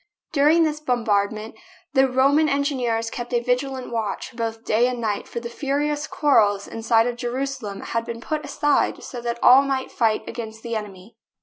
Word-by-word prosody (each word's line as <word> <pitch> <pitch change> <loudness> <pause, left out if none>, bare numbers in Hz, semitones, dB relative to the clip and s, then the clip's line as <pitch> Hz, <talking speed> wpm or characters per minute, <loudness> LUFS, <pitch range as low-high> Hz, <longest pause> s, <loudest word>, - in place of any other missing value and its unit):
During 305 +3 +5
this 305 -1 0
bombardment 220 -5 0 0.4
the 265 -1 +4
Ro 260 +2 +3
man 305 +1 +3
engineers 255 -5 0
kept 240 0 -4
a - - +4
vigilant 250 +1 -2
watch 225 -1 -3
both 225 -1 -4
day 230 +3 +3
and 250 -1 -3
night, 215 -3 -2
for 235 - -5
the 235 - -6
furious 290 +4 -2
quarrels 205 -9 +2
inside 225 0 +2
of 240 -1 -2
Jeru 245 +3 -2
salem 235 -8 -6
had 230 0 -2
been 230 0 -5
put 305 +5 -3
aside 295 -1 0
so 245 - -7
that 235 0 -2
all 255 +2 +8
might 270 -1 -2
fight 225 -3 0
against 220 -2 -7
the 235 -1 -3
enemy. 210 0 -7
240 Hz, 185 wpm, -23 LUFS, 225-275 Hz, 0.4 s, all